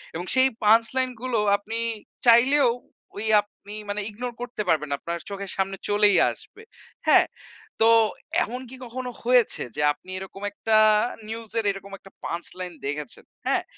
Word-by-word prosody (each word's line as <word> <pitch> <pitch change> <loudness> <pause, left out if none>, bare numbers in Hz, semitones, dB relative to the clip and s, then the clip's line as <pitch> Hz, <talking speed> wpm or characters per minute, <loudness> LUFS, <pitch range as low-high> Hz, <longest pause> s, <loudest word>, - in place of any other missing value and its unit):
এবং 175 +2 -4
সেই 260 +1 +5
punch 225 +2 +6
line 260 -1 +2
গুলো 250 -4 0 0.2
আপনি 220 +3 -6 0.5
চাইলেও 250 +3 +6 0.5
ওই 220 - -2
আপনি 205 0 -13 0.2
মানে 205 +1 -1
ইগনোর 240 +3 -6
করতে 245 -3 -4
পারবেন 150 -2 +2
না। - - +2
আপনার 170 0 -4
চোখের 200 -1 -5
সামনে 195 0 -1
চলেই 205 0 +5
আসবে, 445 - -13 0.4
হ্যাঁ? - - +7 0.6
তো 225 - +6 0.6
এমন 250 +3 -5
কি 260 - -9
কখনো 250 +1 -5
হয়েছে 245 -1 +3
যে - - -1
আপনি 165 +5 -19
এরকম 190 +1 -10
একটা 220 +2 0 0.5
নিউজ 225 -1 -6
এর 220 - -2
এরকম 195 0 -10
একটা 195 - -16
পাঞ্চ 170 +1 -4
লাইন 180 -1 -4
দেখেছেন, 145 -2 -5 0.2
হ্যাঁ? - - +1
210 Hz, 160 wpm, -25 LUFS, 195-245 Hz, 0.6 s, হ্যাঁ